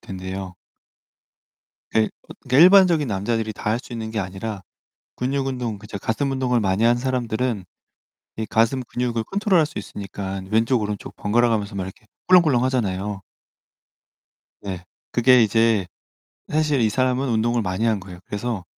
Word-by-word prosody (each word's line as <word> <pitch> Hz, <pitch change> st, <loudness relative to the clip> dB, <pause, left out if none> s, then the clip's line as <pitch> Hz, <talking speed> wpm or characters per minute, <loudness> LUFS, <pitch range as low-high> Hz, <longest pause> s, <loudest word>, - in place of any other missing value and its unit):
된대요. 95 Hz, 0 st, -6 dB, 1.4 s
예. 110 Hz, -, +5 dB, 0.2 s
어 -, -, -11 dB
그 125 Hz, -, +2 dB
일반적인 175 Hz, -2 st, +7 dB
남자들이 110 Hz, +2 st, -1 dB
다 105 Hz, -, -3 dB
할 115 Hz, -, +1 dB
수 125 Hz, -, -12 dB
있는 110 Hz, -2 st, -5 dB
게 110 Hz, -, -3 dB
아니라 95 Hz, +1 st, -4 dB, 0.5 s
근육 135 Hz, +2 st, -1 dB
운동 125 Hz, -5 st, -3 dB
그 105 Hz, -, -13 dB
이제 105 Hz, -1 st, -6 dB
가슴 125 Hz, +8 st, -1 dB
운동을 130 Hz, -2 st, +1 dB
많이 100 Hz, 0 st, +1 dB
하는 120 Hz, +1 st, +4 dB
사람들은 120 Hz, -4 st, -1 dB, 0.7 s
이 110 Hz, -, -2 dB
가슴 115 Hz, +5 st, +2 dB
근육을 120 Hz, -2 st, -2 dB
컨트롤할 195 Hz, -5 st, +2 dB
수 145 Hz, -7 st, -6 dB
있으니까 100 Hz, -1 st, -6 dB
왼쪽 115 Hz, +3 st, +2 dB
오른쪽 105 Hz, -1 st, -5 dB
번갈아 120 Hz, +3 st, +2 dB
가면서 105 Hz, -2 st, -1 dB
막 95 Hz, -, -2 dB
이렇게 95 Hz, +5 st, -10 dB, 0.2 s
꿀렁꿀렁 160 Hz, -9 st, +5 dB
하잖아요. 105 Hz, -6 st, -1 dB, 1.4 s
네. 95 Hz, -3 st, -6 dB, 0.3 s
그게 125 Hz, 0 st, +5 dB
이제 110 Hz, -2 st, +2 dB, 0.7 s
사실 150 Hz, -3 st, +2 dB
이 110 Hz, -, +3 dB
사람은 130 Hz, +3 st, 0 dB
운동을 115 Hz, +1 st, +1 dB
많이 95 Hz, +2 st, -1 dB
한 110 Hz, -3 st, +2 dB
거예요. 90 Hz, -2 st, -11 dB
그래서 105 Hz, -1 st, -3 dB
115 Hz, 330 characters per minute, -22 LUFS, 100-130 Hz, 1.4 s, 일반적인